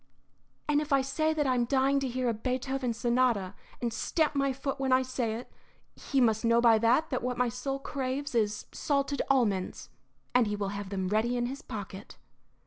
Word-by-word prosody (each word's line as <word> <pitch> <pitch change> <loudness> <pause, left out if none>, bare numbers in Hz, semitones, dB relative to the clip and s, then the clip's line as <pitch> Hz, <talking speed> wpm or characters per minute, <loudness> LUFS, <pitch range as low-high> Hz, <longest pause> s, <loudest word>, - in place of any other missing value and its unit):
"And 295 0 +3
if 300 0 -6
I 275 -1 +4
say 310 +4 0
that 305 -2 0
I 260 - +2
am 240 -1 +1
dying 270 +2 +2
to 270 - -2
hear 255 0 -2
a 235 - +2
Beethoven 255 +2 -2
sonata, 235 -4 +1 0.3
and 235 -2 -2
stamp 305 +7 0
my 275 -1 +1
foot 275 +1 -4
when 265 -1 0
I 255 0 +5
say 250 -4 -2
it, 240 - -8 0.4
he 275 - -1
must 225 -3 +3
know 230 0 +4
by 230 -2 +5
that 250 +8 +2
that 255 - -1
what 250 0 -2
my 250 0 +2
soul 260 +3 -3
craves 275 0 -3
is 215 -3 0
salted 280 -1 0
almonds; 215 -9 0 0.4
and 245 -3 +4
he 210 - -1
will 200 -1 -2
have 200 -1 -5
them 190 -2 -2
ready 225 +4 +1
in 240 - 0
his 270 +4 -5
pocket." 205 -5 -8
250 Hz, 205 wpm, -29 LUFS, 225-275 Hz, 0.4 s, I